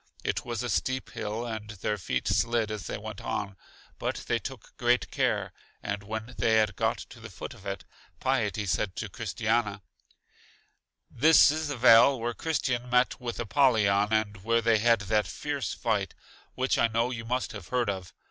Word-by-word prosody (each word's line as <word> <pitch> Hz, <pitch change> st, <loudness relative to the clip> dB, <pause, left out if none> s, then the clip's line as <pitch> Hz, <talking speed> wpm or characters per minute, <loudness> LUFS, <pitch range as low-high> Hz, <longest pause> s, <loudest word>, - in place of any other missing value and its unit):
It -, -, -1 dB
was 120 Hz, -1 st, -3 dB
a -, -, -2 dB
steep 130 Hz, +1 st, -1 dB
hill, 110 Hz, +3 st, -4 dB
and 110 Hz, -2 st, -5 dB
their 105 Hz, 0 st, -3 dB
feet 65 Hz, -7 st, -2 dB
slid 115 Hz, -2 st, +1 dB
as 105 Hz, -7 st, -5 dB
they -, -, -3 dB
went 110 Hz, 0 st, -8 dB
on; 100 Hz, -3 st, -3 dB, 0.4 s
but -, -, -3 dB
they -, -, +1 dB
took -, -, -9 dB
great 120 Hz, 0 st, +2 dB
care, -, -, 0 dB, 0.3 s
and 100 Hz, 0 st, -3 dB
when 110 Hz, +4 st, -6 dB
they 110 Hz, -, +3 dB
had 110 Hz, -1 st, +2 dB
got -, -, 0 dB
to -, -, -12 dB
the -, -, -9 dB
foot -, -, -8 dB
of 100 Hz, -, -12 dB
it, 100 Hz, -2 st, -4 dB, 0.3 s
Piety 110 Hz, -6 st, 0 dB
said 95 Hz, 0 st, -1 dB
to 105 Hz, -, -4 dB
Christiana: 105 Hz, -1 st, -1 dB, 1.3 s
This 150 Hz, +2 st, +6 dB
is 155 Hz, 0 st, -2 dB
the 145 Hz, -2 st, -3 dB
vale 120 Hz, +2 st, +7 dB
where 120 Hz, +1 st, -2 dB
Christian 125 Hz, -5 st, -1 dB
met 125 Hz, +1 st, +2 dB
with 120 Hz, -1 st, -4 dB
Apollyon 110 Hz, -5 st, +3 dB
and 105 Hz, -3 st, 0 dB
where 115 Hz, +2 st, +3 dB
they 115 Hz, -1 st, +4 dB
had 115 Hz, 0 st, +4 dB
that 105 Hz, -1 st, +1 dB
fierce 145 Hz, +4 st, -3 dB
fight 105 Hz, -5 st, -1 dB, 0.4 s
which -, -, +1 dB
I -, -, +5 dB
know 115 Hz, +2 st, 0 dB
you 115 Hz, -2 st, -5 dB
must 125 Hz, +3 st, -2 dB
have 100 Hz, -6 st, -9 dB
heard 125 Hz, -2 st, 0 dB
of. 95 Hz, -3 st, -3 dB
115 Hz, 185 wpm, -28 LUFS, 105-120 Hz, 1.3 s, vale